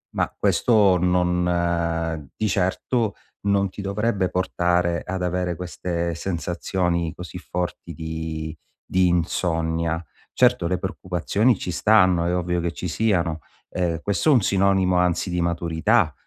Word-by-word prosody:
ma - - 0
questo 105 -6 +4
non 85 -3 0
di 110 - -1
certo 100 +4 0 0.3
non 100 -1 +1
ti 100 - -8
dovrebbe 100 -1 0
portare 90 -2 0
ad 90 0 -3
avere 90 -1 -1
queste 85 -1 -3
sensazioni 85 -1 -2
così 90 +1 -8
forti 90 -1 -4
di 80 0 -5 0.3
di 90 0 +3
insonnia. 85 -1 0 0.3
Certo, 85 - +3
le 90 - 0
preoccupazioni 95 +4 0
ci 90 - -4
stanno, 95 -4 +4
è 90 - 0
ovvio 90 -1 -1
che 85 - -1
ci 90 - -5
siano, 85 -5 0 0.3
ehm, 85 -2 -1
questo 100 - +1
è - - +7
un 125 - +5
sinonimo 95 -1 +2
anzi 90 +1 +1
di 90 - 0
maturità, 85 -1 +1
90 Hz, 135 wpm, -23 LUFS, 85-95 Hz, 0.3 s, è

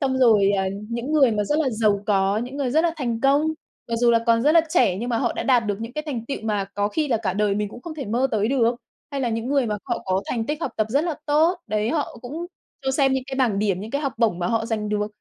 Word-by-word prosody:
xong 265 -2 0
rồi, 215 -6 +5
à, 190 - +1 0.2
những 235 +5 -3
người 275 -5 +5
mà 210 -1 0
rất 295 +9 0
là 285 -5 +1
giàu 215 -2 +1
có, 195 -1 +2
những 250 +4 -5
người 270 -4 -1
rất 315 +5 +3
là 335 - +2
thành 235 -6 -2
công, 275 +2 +4 0.5
mặc 230 - -1
dù 240 +1 +4
là 230 - +5
còn 230 0 +4
rất 300 - +4
là 335 - +7
trẻ 185 - +3
nhưng 235 +5 -4
mà 235 -2 0
họ 235 -1 0
đã - - -3
đạt 245 -4 +3
được 205 0 -2
những 230 +2 -6
cái 305 - -3
thành 240 -6 -4
tựu 275 - -3
mà 210 -3 -1
có 205 0 0
khi 300 +7 -1
là 240 - +2
cả 210 -4 -2
đời 205 +1 +1
mình 210 0 -1
cũng 240 - -11
không 330 +1 -7
thể 290 -3 -5
mơ 245 +5 0
tới 215 -1 +1
được, 245 -3 +2 0.4
hay 275 - -2
là 245 - 0
những 225 +1 -2
người 275 -3 +2
mà 210 -1 -1
họ 240 -3 -3
có 190 0 0
thành 230 -2 -2
tích 300 +1 -3
học - - -2
tập 215 - +1
rất 285 +6 +2
là 335 - -1
tốt, 320 +5 +3
đấy, 215 +1 0
họ 295 -6 -2
cũng 310 +8 -5 0.4
cho 265 - +1
xem 270 0 +2
những 265 -1 -1
cái 270 - -5
bảng 240 -7 +1
điểm, 200 -3 0
những 215 +3 -7
cái 280 - -1
học 275 -3 -1
bổng 220 -7 +2
mà 175 - -1
họ 225 +2 0
dành 215 -2 -2
được. 210 0 0
235 Hz, 305 wpm, -23 LUFS, 210-275 Hz, 0.5 s, là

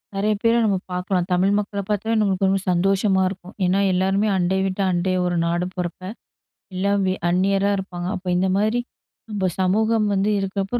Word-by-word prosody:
நிறைய 210 +2 +1
பேர 230 0 +4
நம்ம 200 -3 +2
பாக்கலாம். 180 0 -1
தமிழ் 185 +3 +2
மக்கள 205 0 -4
பாத்தே 215 +2 0
நம்மளுக்கு 195 -2 +1
ரொம்ப 195 -1 +1
சந்தோஷமா 190 +2 +2
இருக்கும். 185 0 -10
ஏன்னா 185 +2 +2
எல்லாருமே 195 +3 +1
அண்டை 185 +2 +1
வீட்ட 190 +1 -2
அண்டை 180 +1 0
ஒரு 175 -1 0
நாடும் 175 +2 -1
போறப்ப, 180 -1 -4 0.7
எல்லாம் 200 +2 +1
வெ 185 - +1 0.2
அந்நியரா 195 +3 +2
இருப்பாங்க. 180 -2 -5
அப்ப 185 -1 -8
இந்த 190 +1 +1
மாதிரி 215 +4 +1 0.5
நம்ப 195 -3 0
சமூகம் 215 +3 +2
வந்து 195 +1 +1
இருக்கப்ப, 195 +3 -2
195 Hz, 165 wpm, -22 LUFS, 185-200 Hz, 0.7 s, பேர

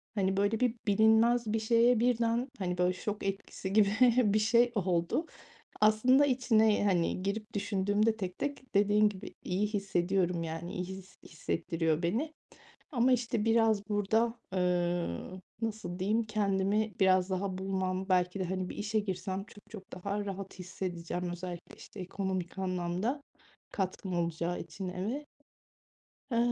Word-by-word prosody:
hani, 190 -2 +1
böyle, 205 +2 +1
bir 250 -2 +2
bilinmez 220 +2 +4
bir 225 - +2
şeye 230 +2 +4
birden, 235 +1 +1
hani, 180 -2 -2
böyle, 180 +1 +2
şok 210 +2 -4
etkisi 195 -1 -4
gibi 205 -1 +5 0.4
bir 215 - +4
şey 235 +3 +4
oldu. 180 - 0 0.6
Aslında 250 +7 +5
içine, 220 -6 +3
hani, 185 -2 +1
girip 215 +3 -3
düşündüğümde 205 +2 +1
tek 185 -4 -5
tek 280 -4 -5
dediğin 205 +1 +4
gibi 200 -1 -9
iyi 190 +4 0
hissediyorum, 190 -3 0
yani, 165 +1 -5
iyi 180 - -2
hi 190 0 -7 0.2
hissettiriyor 160 0 -1
beni 240 - -1 0.6
ama, 250 -1 +3
işte, 235 -3 0
biraz 225 -2 +3
burada, 220 +3 +1 0.2
eee, 175 - 0 0.4
nasıl 210 -5 -3
diyeyim, 210 +5 +1
kendimi 210 0 +1
biraz 185 -1 +4
daha 190 0 -2
bulmam 190 0 -2
belki 180 +1 +1
de, - - 0
hani, 185 0 -2
bir - - -7
işe 215 +1 -1
girsem 190 -1 -3
çok 205 0 -17
çok 200 -3 -11
daha 200 +3 -3
rahat 195 -1 -6
hissedeceğim 180 -1 -4
özellikle, 175 0 -7
işte, 205 - -11
ekonomik 185 -1 -3
anlamda 185 +8 -2 0.5
katkım 190 -1 -3
olacağı 170 +1 -2
için 190 -2 -6
eve. 210 +11 -4 1.1
Eee, 235 - +1
195 Hz, 140 wpm, -31 LUFS, 185-220 Hz, 1.1 s, gibi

